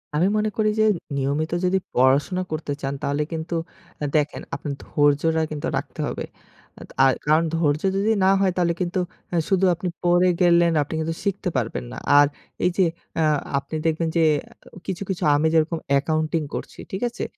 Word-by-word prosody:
আমি 170 +5 +3
মনে 215 0 +1
করি 215 -1 +3
যে 215 - +5 0.3
নিয়মিত 145 +4 -1
যদি 185 +1 +2 0.2
পড়াশোনা 140 +9 +3
করতে 155 -1 -3
চান 135 0 -2
তাহলে 145 +2 0
কিন্তু 165 +1 -3 0.6
দেখেন 150 -1 +1
আপনার 145 -2 -4
ধৈর্যটা 145 +2 +2
কিন্তু 150 -1 -3
রাখতে - - -6
হবে। - - -4 0.8
আ - - +7 0.2
কারণ 155 +2 +4
ধৈর্য 150 -2 +1 0.2
যদি 205 +3 +2
না 190 - +5
হয় 195 -2 +3
তাহলে 170 -1 +2
কিন্তু 180 +1 -1 0.5
শুধু 195 -1 +3
আপনি 180 +2 -4 0.2
পড়ে 175 +1 +4
গেলেন 170 -1 +5
আপনি 145 - -4
কিন্তু 165 +1 -2
শিখতে 200 -1 -1
পারবেন 115 -1 -2
না। - - -7 0.2
আর 145 - +6 0.4
এই - - +5
যে 190 - +5 0.4
আ - - +4 0.3
আপনি 140 +3 -4
দেখবেন 165 +1 +1
যে 165 - +4 0.6
কিছু, 190 -1 -4
কিছু 190 - -2
আমি 150 +2 +2
যেরকম 165 +1 +2
অ্যাকাউন্টিং 155 +3 +1
করছি, - - -6
ঠিক 190 - -4
আছে। 235 - -6
165 Hz, 170 wpm, -23 LUFS, 150-180 Hz, 0.8 s, আ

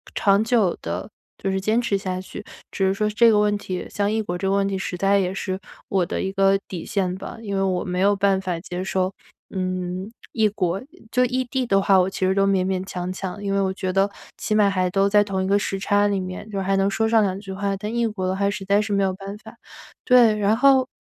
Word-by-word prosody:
长 200 0 +3
久 225 -6 +2
地 85 +3 -4 0.3
就 195 - -2
是 190 - 0
坚 220 +5 +2
持 205 -4 0
下 185 -1 -4
去。 - - -9 0.3
只 195 - 0
是 190 - +2
说 210 +1 0
这 230 +2 +5
个 210 - +4
问 205 0 +2
题 185 -2 -5
像 205 0 -1
异 220 0 0
国 175 -4 -3
这 195 - -2
个 195 - +2
问 200 0 +2
题 195 - -2
实 185 -1 -4
在 195 +2 +3
也 185 -1 -1
是 190 -1 -3 0.3
我 190 -3 +1
的 - - -3
一 190 - -2
个 195 0 +4
底 175 -3 -6
线 190 -4 -1
吧。 195 - -8
因 200 -3 -5
为 - - +1
我 185 -2 0
没 180 0 -3
有 200 +1 +4
办 195 -1 +2
法 180 -3 -2
接 180 0 -5
受， 190 0 -1 0.4
嗯， 185 +1 -3 0.2
异 220 -2 +2
国。 190 -1 -1 0.3
就 250 0 +3
异 255 +1 0
地 260 0 -2
的 195 -3 +3
话， 195 -1 +4
我 180 +1 +2
其 190 - -2
实 190 - +2
都 195 0 +3
勉 190 -2 +2
勉 185 -1 -1
强 180 -1 -4
强， 190 +2 -6
因 200 - -2
为 200 - +2
我 190 -1 0
觉 185 -1 -3
得 195 +1 +3 0.3
起 215 - -1
码 210 -2 +4
还 185 -2 0
都 195 +2 +2
在 205 0 +5
同 190 -2 -2
一 - - -2
个 200 +1 +3
时 195 - -2
差 205 +1 +2
里 200 -1 0
面， 185 +4 -7
就 200 - -5
是 - - -2
还 195 +1 +1
能 195 0 +2
说 220 +2 0
上 225 -1 +4
两 190 -1 -1
句 195 -2 -8
话， 200 +1 -1
但 210 +3 -5
异 235 -1 +1
国 210 -4 -4
的 185 - 0
话 200 0 +1
实 195 -1 -4
在 200 +2 +3
是 210 -1 -3
没 200 - +2
有 190 -1 +1
办 195 +1 -8
法。 - - -14 0.5
对， 235 -4 +5
然 210 +1 +3
后， 265 -1 +5
195 Hz, 285 characters per minute, -23 LUFS, 190-205 Hz, 0.5 s, 这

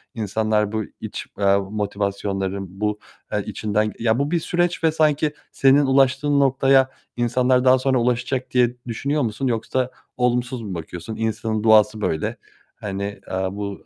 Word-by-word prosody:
insanlar 110 -1 0
bu 110 0 -1 0.2
iç, - - -5
eee, 100 0 +4
motivasyonların, 100 -1 -2
bu, 105 0 0 0.3
eee, - - -1
içinden 105 0 -1
ya 115 +1 +2
bu 140 +2 -1
bir 170 - +2
süreç 175 +1 -1
ve 160 - +4
sanki 155 -1 +2 0.2
senin 140 +1 +4
ulaştığın 135 +2 +3
noktaya 135 -1 +4 0.3
insanlar 125 +1 +2
daha 130 0 +6
sonra 130 0 +1
ulaşacak 125 +2 -1
diye 125 -1 +2
düşünüyor 140 +6 -1
musun 120 +2 -1
yoksa 125 +2 -1 0.3
olumsuz 125 0 0
mu 105 -4 -6
bakıyorsun? 85 +5 -7
İnsanın 110 -1 -2
doğası 110 -1 +5
böyle. 80 -6 -1 0.4
Hani, 100 -1 -5 0.2
eee, 95 0 -1
bu 100 0 -6
115 Hz, 145 wpm, -22 LUFS, 105-135 Hz, 0.4 s, daha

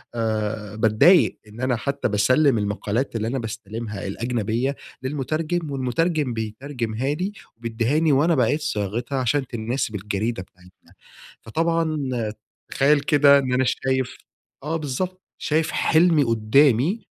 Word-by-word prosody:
آآ 110 -2 -2
باتضايق 110 - +4
إن 110 +3 -11
أنا 130 -1 +1
حتى 140 +4 -2
باسلّم 125 +6 +3
المقالات 105 +4 -2
اللي 110 0 -1
أنا 130 +3 -1
باستلمها 110 -2 -6
الأجنبية 115 +4 -1 0.3
للمُترجم، 155 +4 -2
والمتُرجم 140 +2 0
بيترجمها 115 +3 -3
لي 185 +6 -2 0.3
وبيدّهاني، 120 +7 0
وأنا 155 +5 +3
باعيد 135 +4 +2
صياغتها، 120 -1 -2
عشان 130 +2 0
تناسب 115 -1 -3
الجريدة 105 +1 -2
بتاعتنا، 90 0 -22 0.5
فطبعًا 165 +5 0 0.7
تخيّل 145 +2 +4
كده 140 -1 +5
إن 130 -2 -1
أنا 130 +1 +3
شايف 130 0 -1 0.5
آه 160 +2 -1
بالضبط، 180 +6 -4 0.2
شايف 155 0 0
حلمي 160 -2 +3
قُدامي، 130 - +3
130 Hz, 120 wpm, -23 LUFS, 110-150 Hz, 0.7 s, كده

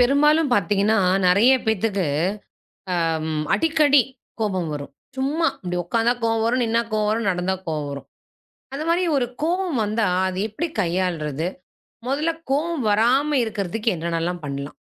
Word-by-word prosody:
பெரும்பாலும் 290 +4 +4
பார்த்தீங்கன்னா, 205 +1 +2 0.3
நிறைய 200 +8 +5
பேத்துக்கு 215 -3 0 1.0
அ - - +1 0.2
ம் 155 -1 -2
அடிக்கடி 300 -4 +4 0.4
கோபம் 190 -6 -1
வரும். 145 -1 -6 0.2
சும்மா. 295 +5 +1
இப்படி 180 -1 -3
உக்காந்தா 230 +6 +2
கோவம் 225 -1 +1
வரும். 250 +2 +1
நின்னா 230 +1 +1
கோவம் 215 -1 +1
வரும். 225 0 -1
நடந்தா 180 +1 -1
கோவம் 150 -3 -2
வரும். 140 0 -7 0.7
அது 285 +3 -3
மாரி 345 +2 +2
ஒரு 255 - +1 0.2
கோவம் 345 -4 0
வந்தா 215 0 0 0.2
அதை 185 0 -3
எப்படி 300 +11 -3
கையாள்றது? 170 -4 -1 0.6
முதல்ல 300 +5 0 0.2
கோவம் 305 +2 0
வராம 245 +8 +3
இருக்கிறதுக்கு 215 +1 -3
என்னென்னலாம் 170 +1 -2
பண்ணலாம்? 140 0 -5
220 Hz, 135 wpm, -22 LUFS, 180-275 Hz, 1.0 s, நிறைய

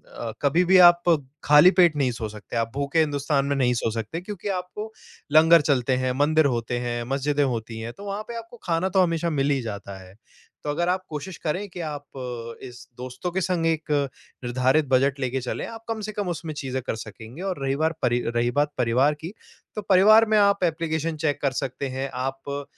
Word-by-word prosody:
अ, 115 -1 -5
कभी 160 +5 +3
भी 190 +2 +5
आप 175 0 -15 0.4
खाली 150 +5 +7
पेट 175 -4 +4
नहीं 130 -3 +1
सो 115 -2 -5
सकते, 105 +2 -10
आप 115 0 -1
भूखे 140 +3 0
हिंदुस्तान 145 -2 +1
में 140 - 0
नहीं 125 -2 +2
सो 115 -1 -1
सकते, 115 +9 -4
क्योंकि 205 +1 -7
आपको 210 +5 -8 0.4
लंगर 165 +1 +7
चलते 135 -3 +1
हैं, 130 - +1
मंदिर 150 +3 +3
होते 115 +1 -3
हैं, 120 -1 -3
मस्जिदें 145 +1 +1
होती 115 -3 -3
हैं, 115 +1 -6
तो 200 - -11
वहाँ 205 +1 -4
पे 235 - -5
आपको 230 +1 -10
खाना 175 +2 0
तो 190 0 +3
हमेशा 170 -1 0
मिल 140 -2 0
ही 135 -2 +1
जाता 100 -3 -7
है। 95 +1 -16 0.5
तो 150 - -4
अगर 175 +4 0
आप 185 +1 0
कोशिश 160 +4 -6
करें 180 +7 -1
कि 180 - -10
आप 145 -3 -5 0.6
इस 125 -1 -11
दोस्तों 130 +8 -5
के 190 - -1
संग 175 -2 0
एक 160 -1 -1 0.5
निर्धारित 130 +5 +2
बजट 135 +1 +2
लेके 130 0 -2
चलें, 125 - -4
आप 225 0 -9
कम 225 -1 -3
से 215 +1 -4
कम 205 -2 -3
उसमें 165 -2 -4
चीज़ें 130 -3 -4
कर - - -3
सकेंगे। 110 - -10
और 185 -6 -3
रही 135 0 0
बार 160 +3 0
परि 120 0 +2 0.2
रही 120 +1 +1
बात 145 0 +1
परिवार 125 +5 +2
की 170 +6 -6 0.4
तो 210 - -3
परिवार 215 +4 +7
में 215 - +4
आप 200 -1 +3
एप्लिकेशन 160 -1 -1
चेक 150 -2 -1
कर 140 - +1
सकते 135 +1 -4
हैं। 135 +1 -4
आप 135 +2 -4
145 Hz, 210 wpm, -24 LUFS, 130-175 Hz, 0.6 s, खाली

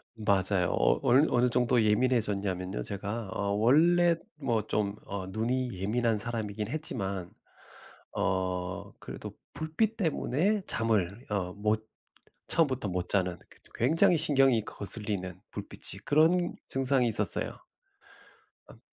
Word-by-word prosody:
맞아요. 100 -3 +1
어 - - +2
얼 135 +6 +4
어느 125 0 +3
정도 125 0 +2
예민해졌냐면요 105 - 0
제가 100 - -5
어 100 0 -2
원래 165 +11 +4 0.2
뭐 125 -7 0
좀 105 -1 -1
어 100 -1 -5
눈이 120 +4 -1
예민한 110 +4 0
사람이긴 105 -2 -3
했지만 100 - -4 0.8
어 90 -1 -2
그래도 - - -8 0.2
불빛 205 +8 -1
때문에 185 - 0
잠을 110 0 0
어 95 -3 -2
못 110 +1 -1 0.6
처음부터 130 - +1
못 90 -1 -3
자는 90 -3 0
그 - - -18
저 - - -23
굉장히 160 +7 +3
신경이 135 -7 +3
거슬리는 100 -3 -2
불빛이 - - -6
그런 170 +4 +3
증상이 135 -1 +2
있었어요. 105 -4 +2 1.0
업 - - -15
110 Hz, 255 characters per minute, -29 LUFS, 100-135 Hz, 1.0 s, 얼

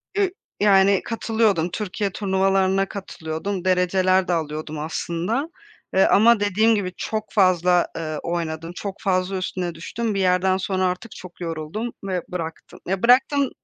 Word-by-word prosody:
Eee, 400 -2 +2 0.3
yani, 195 -1 +5
katılıyordum 220 -6 +1
Türkiye 200 +1 -3
turnuvalarına 195 0 +1
katılıyordum. 185 0 -5
Dereceler 185 0 +2
de 180 - +1
alıyordum 155 -1 -3
aslında, 175 - -2 0.4
eee, 190 - +5
ama 225 +2 +5
dediğim 210 +3 +3
gibi, 185 -3 -2
çok 215 -1 -3
fazla, 180 -3 +3
eee, 155 -2 -3
oynadım, 165 -1 -3
çok 200 0 -5
fazla 185 0 0
üstüne 180 -2 -3
düştüm. 220 +7 -3
Bir - - 0
yerden 185 0 +2
sonra 190 0 -1
artık 185 +5 -3
çok 185 -3 -12
yoruldum 165 +8 -4
ve 185 -2 -2
bıraktım. 165 -2 -6
Ya, 190 +1 -2
bıraktım 265 +3 +4
190 Hz, 140 wpm, -23 LUFS, 175-205 Hz, 0.4 s, yani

